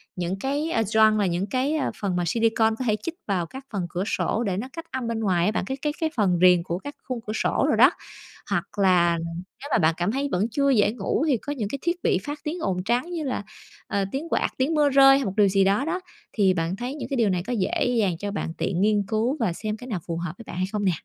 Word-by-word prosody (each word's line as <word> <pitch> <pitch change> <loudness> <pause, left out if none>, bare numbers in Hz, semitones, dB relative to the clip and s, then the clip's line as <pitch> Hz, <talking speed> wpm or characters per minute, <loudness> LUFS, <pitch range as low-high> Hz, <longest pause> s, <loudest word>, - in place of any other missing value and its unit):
những 180 +2 -3
cái, 290 +6 -1
ơ, 225 - +2
gioăng 215 +1 +4
và 205 - +2
những 180 +2 -1
cái, 265 +6 0
ờ, 305 - 0
phần 195 -4 -1
mà 175 - 0
silicone 225 +1 +2
có 255 - -2
thể 215 - +3
chích 335 0 -4
vào 185 -4 0
các 265 +10 -10
phần 190 -4 -1
cửa 180 +2 -2
sổ 230 - 0
để 185 -2 -1
nó 230 +6 -3
cách 330 0 -7
âm 260 -3 -3
bên 230 -1 -2
ngoài 185 -5 +1
á 210 - +2
bạn, 215 - -2
cái 265 +5 -4
cái 295 -1 -1
cái 320 - +2
phần 190 -6 +2
viền 180 -2 +6
của 175 0 -3
các 285 +7 -8
khung 255 -2 -4
cửa 215 - -2
sổ - - +1
đồ - - +3
đó. - - +7 0.6
Hoặc - - +1 0.2
là, 175 -3 +4 0.4
nếu 285 - -6
mà - - +4
bạn 160 0 +3
cảm 175 +4 0
thấy 275 +2 -1
vẫn 195 +5 +1
chưa 280 +4 +2
dễ 210 -6 +4
ngủ 245 +6 -1
thì 265 -5 +3
có 290 +6 -5
những 220 -7 -3
cái 275 - -4
thiết 345 +1 0
bị - - +3
phát 295 0 -5
tiếng 325 +4 -3
ồn 180 - -1
trắng 245 - 0
như 330 -3 -3
là, 255 -7 -2 0.4
ờ, 200 -1 0
tiếng 300 +5 -4
quạt, - - +1
tiếng 265 +5 +1
mưa 295 -2 +4
rơi 270 0 +7
hay 275 - -1
một 195 - -2
điều 205 - +6
gì 195 0 +3
đó 200 +8 +2
đó, 345 +3 -1 0.3
thì 195 -4 +3
bạn 165 +1 -1
thấy 245 +6 -5
những 300 - -6
cái 275 - -1
điều 225 -4 +3
này 180 -2 0
có 250 - -1
dễ 200 -6 0
dàng 185 -5 +1
cho 205 0 -3
bạn 165 -5 -3
tiện 185 -1 -1
nghiên 210 -1 +3
cứu 230 +7 0
và 185 -7 +1
xem 215 +4 -4
cái 250 - -10
nào 205 -7 -2
phù 165 - -2
hợp 170 -1 -4
với 230 - -10
bạn - - -7
hay 185 - +1
không 210 -1 -1
nè? 185 - +4
215 Hz, 285 wpm, -25 LUFS, 185-270 Hz, 0.6 s, đó